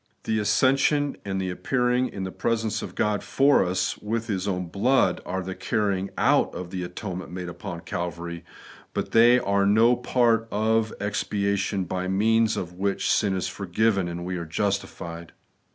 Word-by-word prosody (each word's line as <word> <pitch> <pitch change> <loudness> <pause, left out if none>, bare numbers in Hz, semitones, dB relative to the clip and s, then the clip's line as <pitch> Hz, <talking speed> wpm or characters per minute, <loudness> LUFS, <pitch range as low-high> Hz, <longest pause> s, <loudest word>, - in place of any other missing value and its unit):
The 110 -1 0
ascension 135 +7 +2
and 95 -1 -3
the 95 -1 -2
appearing 125 +5 +1
in 95 - -6
the 95 - -4
presence 110 -1 -1
of - - -7
God 105 -1 +1
for 140 -3 +3
US 90 0 -1
with 115 +2 -2
His 100 -3 -2
own 90 -2 -1
blood, 100 +2 +2
are 95 +1 -2
the 95 +1 -5
carrying 100 -3 -1
out - - +3
of 90 -1 -6
the 95 - -4
atonement 90 +1 -6
made 90 0 -6
upon 85 0 -7
Calvary; 85 0 -5 0.5
but - - -2
they 120 +2 +6
are 100 -4 +1
no 115 +4 +5
part 120 -2 +2
of 110 +1 +1
the - - -4
expiation 100 -1 -1
by 90 +1 -3
means 110 +3 +2
of 90 -3 -4
which 100 +2 0
sin 100 -2 +1
is 95 - -1
for 95 +1 -6
given 100 0 +2
and 85 0 -5
we 90 0 -3
are 85 - -4
justified. 85 -2 -3
100 Hz, 175 wpm, -25 LUFS, 90-115 Hz, 0.5 s, they